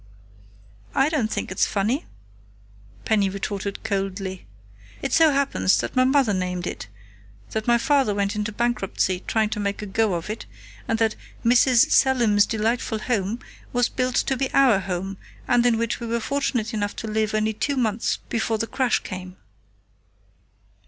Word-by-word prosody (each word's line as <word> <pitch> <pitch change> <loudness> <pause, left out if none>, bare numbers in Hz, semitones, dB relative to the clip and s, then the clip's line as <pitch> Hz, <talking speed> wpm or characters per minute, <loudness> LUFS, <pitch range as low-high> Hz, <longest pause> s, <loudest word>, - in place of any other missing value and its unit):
"I 270 +2 +4
don't 275 -9 0
think - - -3
it's - - +2
funny," 220 - -1 1.0
Penny 205 -3 +2
retorted 200 0 -4
coldly. 195 - -3 0.6
"It - - -2
so 325 -1 +6
happens 275 -8 +2
that - - -3
my 255 0 +4
mother 265 -5 +3
named 180 -1 -2
it, 95 - -5 0.6
that 220 +1 -3
my 240 0 +5
father 270 -4 +2
went 200 +1 0
into 210 0 -2
bankruptcy 200 -5 -1
trying 220 -1 +1
to 210 - -2
make 200 0 -2
a - - -4
go 205 -1 +1
of 170 - -4
it, 215 - -6 0.4
and 225 - +1
that 225 -1 +1 0.3
'Mrs. 245 0 +5
Selim's 235 -6 +4
delightful 225 +1 -1
home' 215 0 -2 0.3
was 245 0 +2
built 255 -1 -1
to 265 - +1
be 265 +1 -2
our 255 -7 +5
home, 190 +1 -4 0.3
and 245 0 +4
in 235 -2 +3
which 230 0 -1
we 235 - -5
were 235 +1 0
fortunate 245 -3 -1
enough 205 -1 -2
to 225 - -5
live 215 0 0
only 215 0 +1
two 275 +6 -2
months 225 -3 0
before 225 -1 -1
the 225 - -1
crash 255 +1 0
came." 185 0 -7
220 Hz, 165 wpm, -24 LUFS, 200-245 Hz, 1.0 s, so